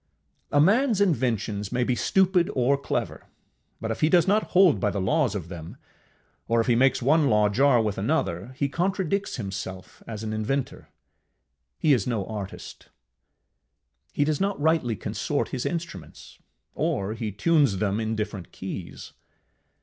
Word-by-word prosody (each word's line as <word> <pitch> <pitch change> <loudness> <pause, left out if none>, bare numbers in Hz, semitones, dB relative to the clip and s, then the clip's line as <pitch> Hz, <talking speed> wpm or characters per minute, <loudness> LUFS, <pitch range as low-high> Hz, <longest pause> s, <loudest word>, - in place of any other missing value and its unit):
A 145 - +3
manŌĆÖs 220 - +3
inventions 115 - 0
may 125 - +1
be 125 - +1
stupid 185 +5 +2
or 130 +2 +3
clever, 140 - -4 0.5
but 110 - -3
if 115 - -5
he 155 - +4
do 180 - +6
not 210 +2 +3
hold 180 - +6
by 105 - +1
the 100 - -3
laws 130 +2 +1
of 90 -5 -5
them, 85 -2 -9 0.7
or 115 0 +2
if 115 - +2
he 120 - +3
make 130 +2 +3
one 145 +3 +3
law 105 -1 +3
jar 130 +3 +4
with 105 -3 -1
another, 110 - -1
he 140 - +1
contradicts 190 +4 -1
himself 95 -4 -7
as 110 -1 -6
an 110 0 -3
inventor, 120 +5 -3 0.9
he 150 - +3
is 125 - 0
no 110 -6 -1
artist. 105 -3 -8 1.2
He 145 - +1
does 150 +2 -1
not 200 -2 0
rightly 155 -7 +1
consort - - -2
his 125 - -3
instruments, 160 - -7 0.3
or 100 +2 -1
he 110 -1 -4
tunes 140 - +2
them 100 +1 0
in 110 0 -2
different 105 -5 -5
keys. 95 -2 -8
120 Hz, 155 wpm, -25 LUFS, 105-155 Hz, 1.2 s, do